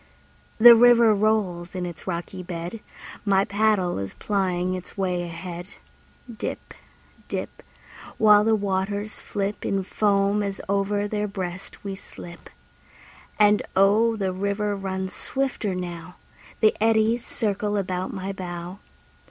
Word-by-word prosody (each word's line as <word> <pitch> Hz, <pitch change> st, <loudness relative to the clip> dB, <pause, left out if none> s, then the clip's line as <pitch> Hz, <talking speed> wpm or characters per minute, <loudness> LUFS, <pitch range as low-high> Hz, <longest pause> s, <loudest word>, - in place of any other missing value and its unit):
The 235 Hz, +1 st, +10 dB
river 235 Hz, -1 st, +6 dB
rolls 200 Hz, -5 st, 0 dB
in 180 Hz, -1 st, -2 dB
its 170 Hz, -1 st, -8 dB
rocky 185 Hz, +1 st, -4 dB
bed; 175 Hz, +3 st, -6 dB, 0.4 s
My 195 Hz, -1 st, +3 dB
paddle 205 Hz, -, +1 dB
is 100 Hz, 0 st, -5 dB
plying 185 Hz, -3 st, -1 dB
its 185 Hz, +1 st, -8 dB
way 180 Hz, -2 st, 0 dB
ahead; 175 Hz, +1 st, -7 dB, 0.6 s
Dip, -, -, -5 dB, 0.5 s
dip, -, -, -5 dB, 0.6 s
While 210 Hz, -1 st, +6 dB
the 220 Hz, 0 st, +3 dB
waters 200 Hz, +1 st, -2 dB
flip 205 Hz, 0 st, -3 dB
In 195 Hz, -1 st, 0 dB
foam 200 Hz, +1 st, +1 dB
as 200 Hz, -1 st, -3 dB
over 200 Hz, +1 st, 0 dB
their 210 Hz, 0 st, -2 dB
breast 185 Hz, -2 st, -6 dB
we 200 Hz, -1 st, -4 dB
slip. 175 Hz, -2 st, -10 dB, 0.9 s
And 210 Hz, 0 st, +5 dB
oh, 215 Hz, +4 st, +4 dB
the 195 Hz, -3 st, -2 dB
river 200 Hz, +2 st, -1 dB
runs 190 Hz, -1 st, -4 dB
swifter 260 Hz, -8 st, -2 dB
now; 180 Hz, 0 st, -6 dB, 0.5 s
The 215 Hz, -1 st, +5 dB
eddies 225 Hz, +1 st, +3 dB
circle 210 Hz, -3 st, -1 dB
about 185 Hz, -1 st, -2 dB
my 195 Hz, 0 st, -4 dB
bow. 175 Hz, 0 st, -7 dB
195 Hz, 125 wpm, -24 LUFS, 185-210 Hz, 0.9 s, The